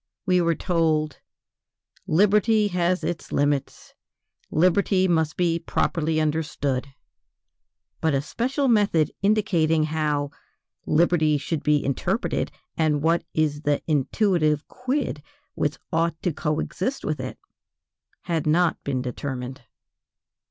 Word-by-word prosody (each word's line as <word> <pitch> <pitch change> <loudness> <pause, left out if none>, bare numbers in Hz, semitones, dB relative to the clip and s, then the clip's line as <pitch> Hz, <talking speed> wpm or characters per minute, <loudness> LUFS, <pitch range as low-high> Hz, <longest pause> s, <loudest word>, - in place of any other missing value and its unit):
We 180 -2 +3
were 170 -1 +2
told: 160 -4 0 0.9
"Liberty 210 +4 +3
has 180 0 0
its 175 -1 -4
limits," 145 -1 -1 0.6
"Liberty 185 +3 +3
must 160 -3 +1
be 170 -2 +1
properly 160 -1 0
understood." 150 -4 -1 1.1
But 160 -3 +1
a 135 - +1
special 265 - -1
method 200 - +3
indicating 185 -7 +2
"how 150 -2 -1 0.6
liberty 155 -1 +3
should 145 +2 -3
be 150 -1 +2
interpreted, 140 -2 -1 0.2
and 150 -2 +1
what 165 +1 +2
is 150 -2 +1
the 145 -1 0
intuitive 155 - +1
quid 255 - -2 0.3
which 150 0 -1 0.2
ought 165 0 +1
to 175 - 0
co 150 +2 -1
exist 230 - -3
with 150 -2 -2
it," 130 0 -5 0.9
had 165 -3 -1
not 170 +2 +2
been 130 -2 -2
determined. 130 0 -5
160 Hz, 115 wpm, -24 LUFS, 150-180 Hz, 1.1 s, We